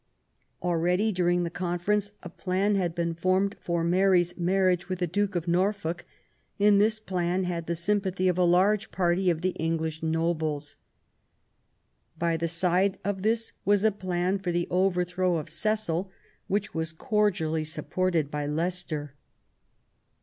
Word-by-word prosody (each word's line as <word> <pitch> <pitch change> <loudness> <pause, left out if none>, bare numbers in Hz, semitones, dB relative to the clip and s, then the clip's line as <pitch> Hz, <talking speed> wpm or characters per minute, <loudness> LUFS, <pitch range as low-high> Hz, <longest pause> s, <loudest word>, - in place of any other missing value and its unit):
Already, 180 +5 +1
during 175 -2 +1
the 170 - -3
conference, 185 +4 -1
a 175 - -7
plan 190 +3 0
had 180 -4 0
been 170 -1 -1
formed 185 +4 +1
for 170 -1 -1
Mary's 175 0 +3
marriage 185 0 +1
with 185 - -2
the 180 - 0
Duke 200 +3 -1
of 175 0 -2
Norfolk, 175 -1 0 0.5
and 205 0 +5
this 215 +1 +2
plan 180 -2 -1
had 170 -2 -3
the 170 - 0
S3anpathy 185 +1 0
of 180 - +2
a 180 - +2
large 195 +5 +3
party 180 0 +1
of 165 -2 0
the 185 +1 +1
English 160 -1 -1
nobles. 160 -2 -1 1.4
By 170 -1 +1
the 165 +1 -1
side 180 +3 +1
of 195 -1 -2
this 225 +2 0
was 205 0 +3
a 220 - +4
plan 185 -1 -1
for 185 -2 -2
the 175 0 -1
over 180 0 +2
throw 180 0 0
of 155 0 -6
Cecil, 190 0 -1 0.4
which 200 +1 -1
was 160 0 -3
cordially 160 -5 0
supported 165 -1 -1
by 150 -1 -2
Leicester. 160 -2 -3
180 Hz, 150 wpm, -27 LUFS, 170-195 Hz, 1.4 s, and